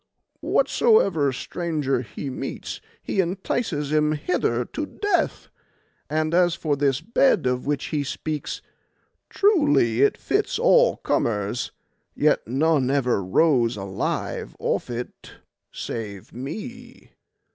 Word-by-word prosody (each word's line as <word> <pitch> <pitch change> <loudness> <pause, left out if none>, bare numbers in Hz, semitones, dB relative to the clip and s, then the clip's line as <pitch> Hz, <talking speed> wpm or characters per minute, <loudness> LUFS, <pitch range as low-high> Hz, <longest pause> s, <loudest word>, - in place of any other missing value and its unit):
Whatsoever 200 - +3
stranger 150 -2 -2
he 125 +4 -6
meets - - -5 0.2
he - - -2
entices 175 - -2
him 150 0 +3
hither 145 -6 0
to 305 - -4
death; 380 -3 -1 0.6
and 155 +1 0
as 175 -1 +4
for 155 -3 0
this 140 -2 +1
bed 230 - +3
of 125 +1 -1
which 145 -1 -1
he 145 -2 +1
speaks, 150 +1 -4 0.7
truly 145 - +3
it 140 - +4
fits - - 0
all - - +4
comers, 105 0 -1 0.4
yet - - +2
none 135 +1 +2
ever 125 -7 +1
rose 120 - +3
alive 95 -1 -3
off - - -1
it 120 0 -7 0.4
save 105 -4 -6
me. 235 - -8
145 Hz, 115 wpm, -24 LUFS, 125-175 Hz, 0.7 s, as